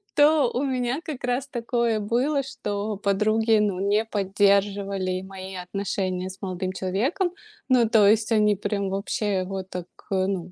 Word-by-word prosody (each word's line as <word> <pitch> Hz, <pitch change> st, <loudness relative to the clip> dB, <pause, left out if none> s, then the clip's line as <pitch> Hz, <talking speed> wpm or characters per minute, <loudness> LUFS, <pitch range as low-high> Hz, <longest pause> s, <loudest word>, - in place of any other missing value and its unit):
то 295 Hz, -3 st, +5 dB
у 250 Hz, -, 0 dB
меня 255 Hz, 0 st, -1 dB
как 305 Hz, -6 st, -6 dB
раз 250 Hz, +2 st, -1 dB
такое 235 Hz, -3 st, 0 dB
было, 250 Hz, +8 st, +1 dB
что 210 Hz, -5 st, -4 dB
подруги, 215 Hz, +3 st, +2 dB
ну, 205 Hz, -3 st, 0 dB
не 205 Hz, +3 st, +2 dB
поддерживали 200 Hz, -2 st, +1 dB
мои 190 Hz, 0 st, -8 dB
отношения 185 Hz, 0 st, -3 dB
с 190 Hz, -, -11 dB
молодым 185 Hz, -1 st, -3 dB
человеком. 235 Hz, -, -1 dB, 0.4 s
Ну 245 Hz, -3 st, +5 dB
то 220 Hz, -3 st, +5 dB
есть 220 Hz, +2 st, +3 dB
они 210 Hz, -2 st, +4 dB
прям 200 Hz, 0 st, -2 dB
вообще 200 Hz, 0 st, -1 dB
его 190 Hz, +1 st, -3 dB
так 180 Hz, -2 st, -6 dB, 0.3 s
ну 190 Hz, -2 st, -1 dB
205 Hz, 150 wpm, -25 LUFS, 190-235 Hz, 0.4 s, то